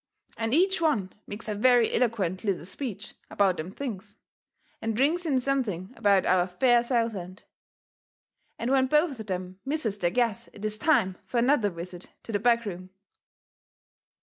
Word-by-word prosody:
And 225 0 -2
each 370 +5 +3
one 215 - +1
makes 210 +2 -7
a 215 - -1
very 240 +2 +4
eloquent 205 -7 0
little 195 -6 -1
speech 215 -1 -6 0.2
about 195 -3 +2
them 155 +3 -5
things, 205 -5 -6 0.7
and 225 0 -2
rings 330 +6 +2
in 270 -4 +2
something 245 -8 -2
about 200 -4 +3
our 180 -1 +3
fair 240 +6 +3
Southland. 225 -7 -2 1.1
And 235 +3 -2
when 265 -1 +4
both 300 -2 +2
of 220 - -7
them 185 0 -5
misses 270 -8 -2
their 175 - +2
guess 230 +1 0
it 205 - -8
is 215 0 0
time 190 - +2
fur 245 - -4
another 235 -3 +3
visit 175 0 -9
to - - -7
the 205 - 0
back 235 +1 +3
room. 185 -2 -6
220 Hz, 160 wpm, -27 LUFS, 185-255 Hz, 1.1 s, very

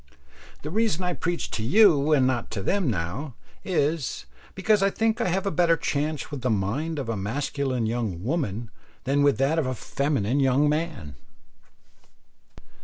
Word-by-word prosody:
The 150 - -5
reason 210 -3 +1
I 180 0 0
preach 175 +1 -3
to 110 - -3
you 155 - +5
and 140 -4 +4
not 125 -2 -1
to 100 - -3
them 190 - +1
now, 110 - -3 0.3
is, 160 - -1 0.3
because 205 +2 +2
I 195 - +4
think 225 +3 0
I - - +1
have 190 +3 0
a 200 - 0
better 170 -2 +3
chance 150 0 -2
with 145 -3 -5
the 125 - 0
mind 115 +11 -1
of 135 -4 -3
a 115 - -1
masculine 130 +4 -2
young 110 -6 -2
woman 120 - -2 0.3
than 140 +3 +1
with 145 -1 +3
that 140 +5 +2
of 145 - 0
a 130 - -2
feminine 140 -1 -1
young 135 +2 +3
man. 150 - -2
140 Hz, 170 wpm, -25 LUFS, 120-165 Hz, 0.3 s, you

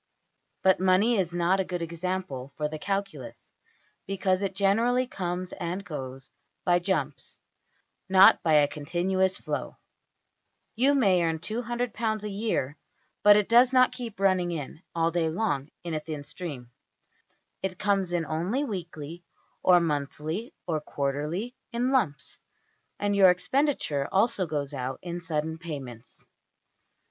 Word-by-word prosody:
But 190 -2 +5
money 190 +5 +3
is 175 -3 0
not 175 +2 +2
a - - +2
good 180 -2 -4
example 170 -6 -4
for 150 - 0
the 155 0 -6
calculus, 195 +2 -4 0.5
because 190 -1 0
it 195 -1 -2
generally 230 +6 +2
comes 180 -5 -4
and 180 +2 -4
goes 135 -5 -7 0.3
by 175 -1 +4
jumps, 190 +2 -2 0.7
not 190 +1 +7
by 160 - +2
a 145 -1 +6
continuous 180 +6 0
flow - - -4 1.0
you 270 +5 +3
may 195 -9 +4
earn 165 -1 0
£$200$ 225 +2 -2
a 210 - -3
year, 195 - -2 0.4
but 205 0 +8
it 210 - +2
does 240 +2 +6
not 255 -1 +5
keep 240 -5 -7
running 185 -3 +2
in 155 -1 -6
all 165 0 +2
day 165 -1 +1
long 160 -6 -1
in 170 -2 -4
a 155 - 0
thin 150 -1 -6
stream; 145 -6 -7 0.9
it 190 -1 -3
comes 195 -3 +1
in 175 -2 0
only 180 - -1
weekly, 170 - -6 0.4
or 180 -1 +6
monthly, 155 - -2
or 160 -3 -1
quarterly, 150 - -3 0.2
in 245 +2 0
lumps: 195 - 0 0.6
and 205 0 0
your 195 -2 +7
expenditure 180 - +1
also 195 -2 +2
goes 145 -2 -2
out 130 -1 -3
in 175 -1 -4
sudden 160 -1 -3
payments. 135 -8 -8
180 Hz, 140 wpm, -27 LUFS, 155-200 Hz, 1.0 s, but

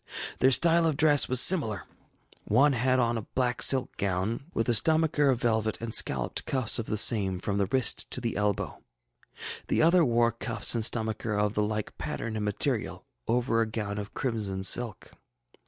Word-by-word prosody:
Their 130 - +4
style 165 +4 +3
of 155 -3 -1
dress 150 -2 +3
was 130 -1 +5
similar; 115 - +4 0.6
one 140 +2 +2
had 130 +1 0
on 120 -2 0
a 110 - -12
black 125 -2 -1
silk 130 -2 +3
gown, 100 +6 -3
with 115 - -3
a 120 - +1
stomacher 155 +3 +2
of 125 -3 0
velvet, 110 -2 -1
and 115 -1 -7
scalloped - - 0
cuffs 130 -3 +1
of 115 - -5
the 110 - -3
same 100 -4 +3
from 100 +2 -3
the 100 - 0
wrist 130 +3 +1
to - - -1
the 120 -2 -4
elbow; 105 -1 -3 0.9
the - - 0
other 170 +2 +4
wore 120 -3 +1
cuffs 115 - -1
and 115 -2 -2
stomacher 110 -1 -1
of 105 0 -1
the 105 - -1
like 105 0 -4
pattern 110 -1 -5
and 105 - -4
material, 105 -1 -3 0.2
over 120 -1 0
a 115 - -1
gown 105 -2 -5
of 105 0 -9
crimson 105 -7 -3
silk. 115 +2 +1
115 Hz, 185 wpm, -26 LUFS, 105-130 Hz, 0.9 s, was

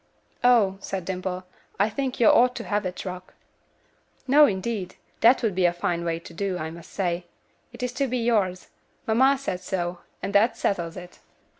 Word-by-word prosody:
"Oh!" 225 -6 +4
said 190 -2 -5
Dimple. 185 0 -3 0.4
"I 205 - +4
think 260 +4 -3
you 235 - +4
ought 245 +3 +5
to - - -5
have 205 -2 -1
it, 180 - -7
Rock." 185 0 -7 0.9
"No, 290 +3 +7
indeed. 195 -1 -3 0.2
That 240 +3 +5
would 220 -4 +1
be 180 0 +2
a 175 - +3
fine 175 0 -2
way 165 -1 -1
to 170 0 -12
do, 190 +1 -2
I 160 -1 -4
must 170 +1 -12
say. 175 -2 -2 0.5
It 240 +1 -8
is 250 0 -2
to 275 - +3
be 250 0 -1
yours. 210 -6 0 0.4
Mamma 260 +5 +4
said 230 -10 -3
so, 180 -1 -3 0.2
and 195 +2 -3
that 210 +4 +4
settles 170 -4 -1
it." 180 0 -11
195 Hz, 185 wpm, -25 LUFS, 180-235 Hz, 0.9 s, No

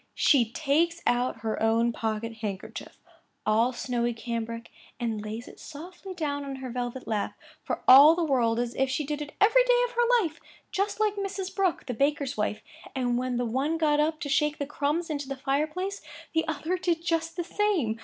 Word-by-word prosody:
She 240 -7 +4
takes 325 +5 +1
out 245 -2 +1
her 220 0 -2
own 225 +1 +3
pocket 225 0 -3
handkerchief, 205 -4 -6 0.5
all 225 +4 +3
snowy 240 -1 -1
cambric, 230 0 -5 0.3
and 225 -3 -2
lays 215 +3 -6
it - - -13
softly 360 +5 -9
down 290 -4 -2
on 275 -1 -5
her 260 -2 -6
velvet 245 +1 -4
lap, 210 -2 -1 0.3
for - - -3
all 285 +5 +10
the 345 - 0
world 240 -6 +2
as 240 0 -1
if 265 0 +1
she 280 +3 -1
did 295 +1 -3
it 295 0 -6
every 460 +5 +6
day - - +4
of - - -6
her 480 -1 +3
life, 325 -1 -5 0.3
just 405 +2 -1
like 420 -1 +1
Mrs. 390 -1 -4
Brooke, 380 -4 0
the 250 - -3
baker's 280 +2 0
wife; 210 -1 -2 0.3
and 245 -2 0
when 255 -1 -1
the 245 - 0
one 270 +8 0
got 300 -2 +2
up 310 +1 +1
to 290 - -3
shake 300 +1 +1
the 285 - -2
crumbs 295 +4 -1
into 285 -2 -3
the 275 - -4
fire 275 +3 0
place, 375 +5 -4 0.3
the 320 0 +1
other 320 +4 -2
did 335 -2 -1
just 330 -1 0
the 350 - -1
same. 345 - 0
285 Hz, 200 wpm, -27 LUFS, 240-335 Hz, 0.5 s, all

